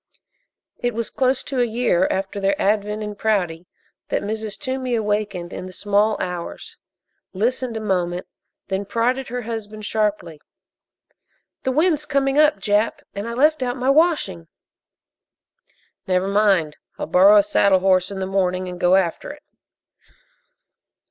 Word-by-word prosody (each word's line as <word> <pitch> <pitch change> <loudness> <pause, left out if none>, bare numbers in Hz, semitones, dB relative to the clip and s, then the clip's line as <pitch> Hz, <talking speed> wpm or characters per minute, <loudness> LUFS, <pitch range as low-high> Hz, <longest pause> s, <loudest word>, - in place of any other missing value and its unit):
It 245 -2 -2
was 230 -1 -3
close 260 0 +1
to 265 - -3
a - - +4
year 230 -6 +1
after 195 +1 -2
their 195 0 0
advent 210 +1 0
in 210 0 -5
Prouty 180 -5 -1 0.4
that - - -1
Mrs. 215 0 -4
Toomey 260 -3 -2
awakened 205 -5 -2
in 185 - -6
the - - -9
small 205 +3 +1
hours, 180 -2 -5 0.6
listened 235 +3 -1
a - - -4
moment, 180 -3 -1 0.4
then 195 +1 -2
prodded 245 +5 -1
her 245 +1 -4
husband 215 -2 -6
sharply: 205 -8 -2 1.2
"The 260 - -1
wind's 305 +1 +1
coming 275 -1 +1
up, 305 0 +5
Jap, 210 +1 0
and 200 +2 -5
I 235 - -4
left 300 +3 +3
out 250 0 -2
my 255 +2 +2
washing." 295 - +2 1.6
"Never 185 0 +1
mind 195 -7 +2 0.2
I'll - - -3
borrow 190 +5 +6
a 205 - +6
saddle 195 -2 +3
horse 185 -1 +3
in 195 -1 -6
the 190 - -2
morning 185 -1 0
and 180 -1 -7
go 180 +1 +4
after 185 -3 0
it." - - -10
210 Hz, 150 wpm, -21 LUFS, 190-245 Hz, 1.6 s, borrow